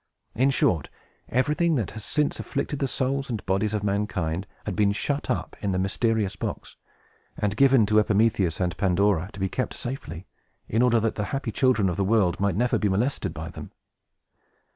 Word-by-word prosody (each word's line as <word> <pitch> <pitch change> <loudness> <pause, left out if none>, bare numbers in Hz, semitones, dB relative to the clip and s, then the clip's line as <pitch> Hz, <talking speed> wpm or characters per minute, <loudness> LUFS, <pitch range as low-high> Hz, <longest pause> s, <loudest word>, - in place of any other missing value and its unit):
In 130 +3 +3
short, 90 - +1 0.4
everything 150 +6 +2
that 115 -8 -1
has 110 0 -7
since 150 +4 0
afflicted 145 - -3
the 135 - 0
souls 135 +2 -1
and 115 -4 -4
bodies 100 +3 0
of 105 - -2
mankind 100 -3 -1 0.2
had 105 - -3
been 105 -1 +3
shut 145 +7 -2
up - - -2
in 100 -2 -1
the - - 0
mysterious 105 +2 0
box, - - -5 0.6
and 105 -1 -1
given 135 -2 +5
to 110 +1 +4
Epimetheus 105 -5 +2
and 90 -2 0
Pandora 95 -1 +2
to 100 - -11
be 95 - +1
kept 130 +7 -3
safely, 95 - -6 0.4
in 115 - +1
order 120 -2 +4
that 110 0 0
the 105 - -3
happy 135 -1 -3
children 120 -3 +2
of 90 - -2
the 100 - +1
world 95 -3 +2
might 100 -2 +1
never 120 +4 +1
be 105 - +1
molested 115 +9 0
by - - -6
them. - - -10
105 Hz, 185 wpm, -25 LUFS, 95-125 Hz, 0.6 s, given